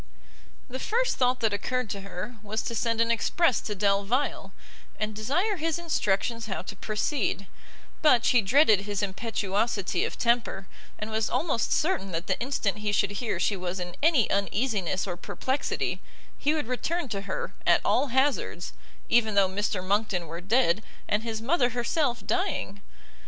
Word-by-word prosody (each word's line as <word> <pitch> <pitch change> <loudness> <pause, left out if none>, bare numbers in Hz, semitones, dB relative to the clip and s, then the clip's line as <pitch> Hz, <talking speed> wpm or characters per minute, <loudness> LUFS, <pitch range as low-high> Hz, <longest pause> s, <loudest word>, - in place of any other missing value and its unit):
The 260 +1 -6
first 485 - 0
thought 250 0 +2
that 220 -2 +2
occurred 250 +4 -1
to 200 - -4
her, 195 +5 -7
was 215 +1 -3
to 235 - -3
send 230 0 0
an 230 0 +3
express 255 +5 +2
to 210 - -4
Delvile, 200 +7 0 0.5
and 215 0 -2
desire 345 - 0
his 325 0 0
instructions 230 - 0
how 195 - -3
to - - -7
proceed; 215 -1 -1 0.6
but 255 -7 +5
she 245 - +5
dreaded 215 -1 +5
his 205 0 -3
impetuosity 205 0 -1
of - - -3
temper, 235 -5 +1 0.3
and 215 +1 -5
was 220 0 0
almost 275 -9 0
certain 300 - +1
that 165 +2 -2
the - - -1
instant 235 -5 -1
he 210 -1 -1
should 205 0 +2
hear 220 +3 -2
she 205 - +1
was 185 0 -4
in 175 -1 -5
any 295 -7 +4
uneasiness 200 -2 0
or 180 -3 -3
perplexity, 260 +9 -2 0.3
he 300 +2 +1
would 305 - -1
return 305 +7 -2
to 200 -2 -3
her, 195 -1 -4
at - - +6
all 290 - +3
hazards, 265 +3 0 0.3
even 220 -3 +3
though 200 -1 +5
Mr 195 0 -2
Monckton 200 -2 +1
were 165 +2 -7
dead, 205 -1 +2 0.3
and 205 +1 +1
his 225 -1 -4
mother 255 -1 +3
herself 245 +1 0
dying. 360 - -1
220 Hz, 165 wpm, -27 LUFS, 200-260 Hz, 0.6 s, at